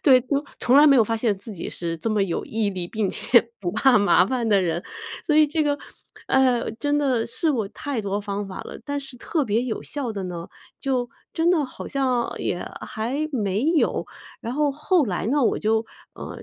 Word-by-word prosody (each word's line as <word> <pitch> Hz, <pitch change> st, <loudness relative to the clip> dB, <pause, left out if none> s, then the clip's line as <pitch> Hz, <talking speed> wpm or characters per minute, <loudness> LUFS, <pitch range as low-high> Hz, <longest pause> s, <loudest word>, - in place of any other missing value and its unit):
对， 260 Hz, -4 st, +7 dB
就 280 Hz, +3 st, -1 dB
从 250 Hz, +2 st, +4 dB
来 295 Hz, +1 st, +8 dB
没 280 Hz, -2 st, +7 dB
有 230 Hz, -, +6 dB
发 225 Hz, +2 st, -1 dB
现 220 Hz, -3 st, +1 dB
自 220 Hz, -, -8 dB
己 175 Hz, -, -6 dB
是 165 Hz, -1 st, -3 dB
这 225 Hz, +8 st, -3 dB
么 210 Hz, -2 st, +2 dB
有 180 Hz, -4 st, -2 dB
毅 215 Hz, -2 st, -1 dB
力， 180 Hz, -3 st, -4 dB
并 215 Hz, +2 st, -1 dB
且 235 Hz, -2 st, +3 dB
不 180 Hz, -3 st, -1 dB
怕 245 Hz, +3 st, +5 dB
麻 200 Hz, -3 st, +5 dB
烦 245 Hz, -1 st, -1 dB
的 200 Hz, -2 st, +4 dB
人。 170 Hz, -1 st, -1 dB, 0.4 s
所 305 Hz, -, +2 dB
以 310 Hz, 0 st, +7 dB
这 310 Hz, +2 st, 0 dB
个， 290 Hz, -1 st, 0 dB, 0.5 s
呃， 260 Hz, -3 st, +3 dB
真 290 Hz, +6 st, 0 dB
的 260 Hz, -6 st, +1 dB
试 310 Hz, +6 st, 0 dB
过 220 Hz, -7 st, -1 dB
太 275 Hz, +3 st, -4 dB
多 200 Hz, 0 st, -1 dB
方 200 Hz, 0 st, -4 dB
法 190 Hz, -, -7 dB
了， -, -, -9 dB
但 285 Hz, +1 st, -2 dB
是 270 Hz, -2 st, -4 dB
特 300 Hz, +5 st, -1 dB
别 220 Hz, 0 st, +1 dB
有 245 Hz, -3 st, -3 dB
效 270 Hz, -5 st, -4 dB
的 200 Hz, -3 st, -4 dB
呢， 175 Hz, -2 st, -6 dB, 0.3 s
就 255 Hz, -3 st, 0 dB, 0.2 s
真 330 Hz, +1 st, +2 dB
的 325 Hz, -5 st, +3 dB
好 260 Hz, -, -8 dB
像 255 Hz, -4 st, 0 dB
也 175 Hz, -, -2 dB, 0.2 s
还 265 Hz, +8 st, -2 dB
没 205 Hz, -4 st, 0 dB
有。 320 Hz, 0 st, +2 dB, 0.3 s
然 230 Hz, -, -4 dB
后 295 Hz, 0 st, +2 dB
后 300 Hz, +4 st, +2 dB
来 195 Hz, -4 st, -2 dB
呢， 280 Hz, +5 st, +2 dB
我 -, -, +2 dB
就， 220 Hz, +1 st, +1 dB, 0.3 s
呃， -, -, -8 dB
240 Hz, 230 characters per minute, -24 LUFS, 205-280 Hz, 0.5 s, 来